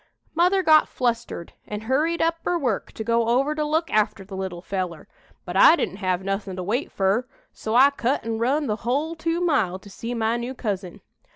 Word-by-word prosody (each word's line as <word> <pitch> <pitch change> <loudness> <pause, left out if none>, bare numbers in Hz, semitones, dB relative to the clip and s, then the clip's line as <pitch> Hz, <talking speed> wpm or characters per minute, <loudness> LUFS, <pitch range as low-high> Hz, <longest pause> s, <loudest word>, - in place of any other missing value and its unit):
"Mother 360 +3 +3
got 310 -2 +6
flustered 235 -8 -2
an' 210 0 -5
hurried 300 +9 +1
up 330 0 +1
'er 355 - +2
work 245 - -2
to 220 - -5
go 230 0 +1
over 265 +5 +2
to 305 0 -1
look 315 +2 0
after 210 -2 +1
the 195 0 -8
little 185 -2 -5
feller, 185 -5 -4 0.4
but 180 - -6
I 310 - +8
didn't 190 - -3
have 185 -2 -1
nothin' 195 -1 -3
to 185 - -4
wait 230 +10 -2
fur, 200 +6 +1 0.3
so 220 +1 -3
I 270 +3 +7
cut 265 -2 -1
an' 225 -1 -2
run 275 +6 +1
the 215 -4 -1
hull 280 +9 -1
two 330 +1 -2
mile 225 - +1
to 200 +1 -15
see 230 +5 -5
my 225 0 +1
new 245 +2 -5
cousin. 195 -7 -4
235 Hz, 205 wpm, -24 LUFS, 195-295 Hz, 0.4 s, I